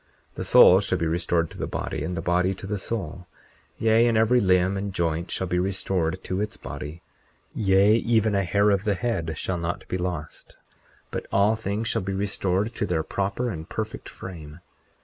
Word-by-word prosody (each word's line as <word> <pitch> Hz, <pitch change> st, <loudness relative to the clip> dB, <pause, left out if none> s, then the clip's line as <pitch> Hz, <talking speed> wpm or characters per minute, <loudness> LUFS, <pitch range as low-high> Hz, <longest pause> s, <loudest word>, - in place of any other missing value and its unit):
40:23 -, -, -36 dB
The -, -, -5 dB
soul -, -, +8 dB
shall -, -, -1 dB
be 85 Hz, -, -1 dB
restored 85 Hz, 0 st, 0 dB
to -, -, -11 dB
the -, -, -2 dB
body, -, -, -4 dB
and 90 Hz, -, -3 dB
the 85 Hz, -, -3 dB
body 90 Hz, +2 st, +1 dB
to 95 Hz, -, -9 dB
the 105 Hz, +1 st, -3 dB
soul; 90 Hz, -5 st, -4 dB, 0.5 s
yea, 115 Hz, +1 st, +4 dB
and 115 Hz, -2 st, +2 dB
every 115 Hz, +3 st, +4 dB
limb 95 Hz, -2 st, +3 dB
and 100 Hz, +1 st, -3 dB
joint 85 Hz, -1 st, -1 dB
shall 95 Hz, -, -2 dB
be 90 Hz, -1 st, 0 dB
restored 95 Hz, -2 st, -1 dB
to 95 Hz, +2 st, -2 dB
its 105 Hz, -, -4 dB
body; 80 Hz, +4 st, -8 dB, 0.5 s
yea, 100 Hz, +2 st, +4 dB
even 110 Hz, -2 st, +2 dB
a 100 Hz, -1 st, +2 dB
hair 100 Hz, +3 st, +3 dB
of 100 Hz, -1 st, +1 dB
the 105 Hz, -2 st, +1 dB
head 85 Hz, -8 st, -2 dB
shall 95 Hz, -2 st, -2 dB
not 85 Hz, +1 st, -4 dB
be 90 Hz, -, -3 dB
lost; 85 Hz, -4 st, -5 dB, 0.5 s
but -, -, -4 dB
all 100 Hz, +3 st, +3 dB
things 110 Hz, +1 st, -3 dB
shall 115 Hz, -, 0 dB
be 95 Hz, +1 st, -3 dB
restored 100 Hz, +2 st, 0 dB
to -, -, -2 dB
their 80 Hz, -3 st, 0 dB
proper 100 Hz, +8 st, -2 dB
and 80 Hz, -4 st, -7 dB
perfect -, -, -5 dB
frame. 80 Hz, -4 st, -9 dB
95 Hz, 200 wpm, -25 LUFS, 90-105 Hz, 0.5 s, soul